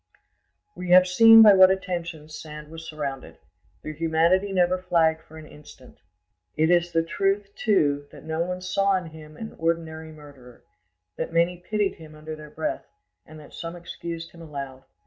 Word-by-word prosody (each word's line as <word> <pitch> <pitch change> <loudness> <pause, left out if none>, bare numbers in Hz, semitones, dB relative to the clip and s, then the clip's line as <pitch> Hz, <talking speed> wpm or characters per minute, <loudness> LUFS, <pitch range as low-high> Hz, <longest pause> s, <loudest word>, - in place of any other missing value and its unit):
We 180 - -7
have 180 +1 +7
seen 225 +4 +8
by 210 -2 +8
what 190 -1 +7
attentions 170 -5 -4
Sand 150 -1 -10
was 165 0 -10
surrounded; 140 -4 -6 0.5
their 155 - -6
humanity 165 +5 +1
never 185 -1 +2
flagged 165 -3 +1
for 160 - -15
an 155 - -11
instant. 150 -4 -16 0.6
It 160 +2 +3
is 175 0 +2
the 165 -1 +1
truth, 195 +3 -1
too, 145 -9 +1
that 145 -3 -13
no 160 0 -3
one 180 +1 -3
saw 195 +2 +1
in 175 -3 -7
him 155 -1 -13
an 220 - -8
ordinary 160 -1 -3
murderer, 140 -5 -15 0.5
that - - -4
many 170 +2 +1
pitied 205 +3 -2
him 155 -1 -13
under 155 +1 -8
their 155 -1 -12
breath, 155 +1 -4 0.4
and 155 0 -12
that 145 - -16
some 165 +1 -7
excused 170 -1 -8
him 170 - -15
aloud. 140 -4 -8
165 Hz, 170 wpm, -24 LUFS, 155-180 Hz, 0.6 s, seen